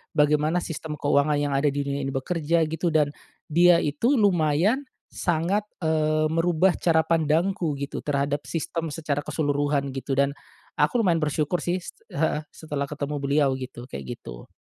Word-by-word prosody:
bagaimana 150 +3 +2
sistem 160 -2 -5
keuangan 145 +1 +2
yang 145 0 0
ada 140 +2 +2
di 145 0 0
dunia 140 0 -2
ini - - -2
bekerja 165 +3 +1
gitu 165 +2 -1
dan, 155 -3 +2 0.4
dia 175 +1 +6
itu 230 - +1
lumayan 200 - +2 0.2
sangat, 175 +5 0 0.2
eee, 155 -1 +2
merubah 175 +2 +3
cara 160 -2 +3
pandangku 165 +1 +1
gitu 140 +1 -4
terhadap 145 0 -1
sistem 165 0 -3
secara 150 -3 -2
keseluruhan 145 -2 -1
gitu 135 +1 -3
dan, 140 +1 +2 0.4
aku 245 - +2
lumayan 170 -6 +2
bersyukur 150 +3 0
sih, 175 +1 0 0.3
heeh, 155 +1 0
setelah 145 -3 -4
ketemu 150 +1 -4
beliau 140 0 +3
gitu 125 -1 -8
kayak 70 - -7
gitu. - - -10
155 Hz, 150 wpm, -25 LUFS, 145-165 Hz, 0.4 s, dia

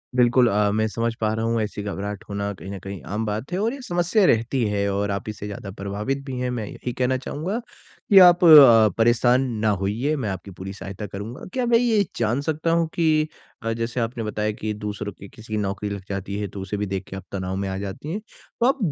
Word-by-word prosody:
बिल्कुल 125 0 +5
अ, 105 0 +2
मैं 110 +1 +1
समझ 115 +1 -1
पा 110 0 +1
रहा 110 +1 -1
हूँ 115 -1 +1
ऐसी 105 -1 -3
घबराहट 100 +1 -4
होना 100 0 -2
कहीं 95 0 -10
न 100 - -5
कहीं 100 -2 -6
आम 110 - -1
बात 110 - -4
है 180 - -1
और 225 +4 0
ये 275 - -8
समस्या 175 +4 +2
रहती 120 -1 +2
है 100 -1 0
और 100 0 -1
आप 100 +2 -4
इससे 105 -1 -6
ज़्यादा 100 -1 -7
प्रभावित 105 +8 -3
भी 130 -3 -5
हैं, 125 0 -1
मैं 115 -4 -3
यही 125 +4 -6
कहना 130 +1 +1
चाहूँगा 165 - -3 0.5
कि 195 -2 +9
आप 180 -1 +7
अ, 120 -9 +9
परेशान 120 +2 +4 0.2
ना - - +4
होइए, 120 +10 0
मैं 120 -8 -2
आपकी 95 0 -6
पूरी 95 +2 -7
सहायता 100 +1 -7
करूँगा। 105 +6 -7
क्या 255 -2 0
मैं 235 -1 +5
ये 230 -4 +3 0.2
जान 120 +5 +1
सकता 160 +2 -1
हूँ 165 -1 +2
कि 155 -2 +2 0.4
अ, 115 0 0
जैसे 115 +2 -3
आपने 115 0 -2
बताया 105 0 -1
कि 105 0 -4
दूसरों 105 0 -5
की 100 - -12
किसी 110 0 -11
की 110 - +1
नौकरी 100 0 -2
लग 100 -1 -5
जाती 100 +1 -4
है, 105 - -2
तो 100 0 -8
उसे 95 +2 -4
भी 105 - -1
देख 95 -1 -3
के 95 - -6
आप 95 - -7
तनाव 95 -1 -3
में 95 0 -2
आ 95 - -3
जाती 100 +10 -6
हैं। 210 - -2
तो 235 +2 -6
आप 270 +2 +3
110 Hz, 240 wpm, -23 LUFS, 100-135 Hz, 0.5 s, कि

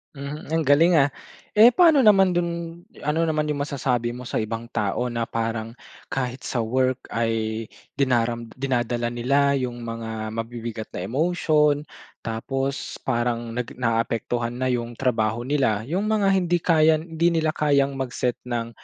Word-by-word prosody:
Mhm, 140 +2 -6
ang 165 - +2
galing, 155 +4 +4
ah. 145 -3 +5 0.5
Eh, 230 +3 +8
paano 330 -2 +6
naman 195 -4 +5
dun 170 -1 -3 0.2
ano 155 +3 +1
naman 155 -1 0
yung 145 -1 -1
masasabi 125 -4 -1
mo 125 0 -8
sa - - -1
ibang 115 +2 -3
tao 120 +3 -1
na 115 -1 -2
parang 115 0 -3 0.3
kahit 125 -1 -4
sa 120 - -1
work 130 +3 0
ay 115 -1 -1 0.3
dinaram 120 -3 +1
dinadala 120 -3 -1
nila 140 +4 +2
yung 125 -2 -4
mga 110 -1 -5
mabibigat 115 -1 -5
na - - -4
emotion. 150 0 +2 0.4
Tapos 135 +5 -3
parang 120 -2 -1
nag 125 - -3
na 115 -2 0
a-apektuhan 115 +1 -1
na 130 +1 -1
yung 120 -1 -2
trabaho 115 -2 0
nila, 130 -5 +1
yung 190 +6 0
mga 215 -2 +2
hindi 175 -3 +2
kayang 160 -2 +4 0.2
hindi 170 +1 +3
nila 155 - +1
kayang 140 -3 +1
mag-set 125 -2 -2
ng 120 -2 -2
130 Hz, 155 wpm, -24 LUFS, 115-150 Hz, 0.5 s, Eh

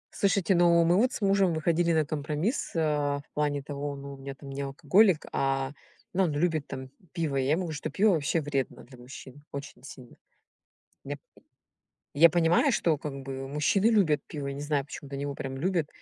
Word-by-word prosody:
Слушайте, 195 -1 +2
но 170 -1 +5
мы 170 +1 +4
вот 245 +6 +3
с - - -6
мужем 195 -3 +3
выходили 170 +2 +1
на 155 -2 +2
компромисс, 155 - -2
а, 150 -3 +1
в - - -31
плане 145 -2 -1
того, 145 0 -4
ну, 140 0 -8
у - - -10
меня 135 0 -7
там 140 +1 -11
не 135 +1 -4
алкоголик, 165 +6 +3
а, 135 0 0 0.4
ну, 190 +2 +3
он 165 -5 0
любит 155 -1 0
там 130 0 -7 0.2
пиво. 165 -5 -2
Я 135 +1 +1
ему, 175 -1 -1
что 145 - -4
пиво 200 +8 +3
ваще 160 0 +1
вредно 140 -3 -3
для 125 0 -15
мужчин 130 +2 -11
очень 140 -2 -8
сильно. 130 -3 -12 0.9
Я, - - -4
п - - -39 0.9
я 160 +4 +7
понимаю, 175 - +3
что, 165 - +1
как 145 -1 -5
бы, 135 0 -6
мужчины 150 +9 +1
любят 195 -10 +3
пиво, 145 -2 -5
не 140 +1 -5
знаю, 145 -1 0
почему-то 140 0 -9
они 140 - -4
его 145 0 -3
прям 135 -1 -5
любят, 170 +1 0
150 Hz, 195 wpm, -28 LUFS, 140-170 Hz, 0.9 s, я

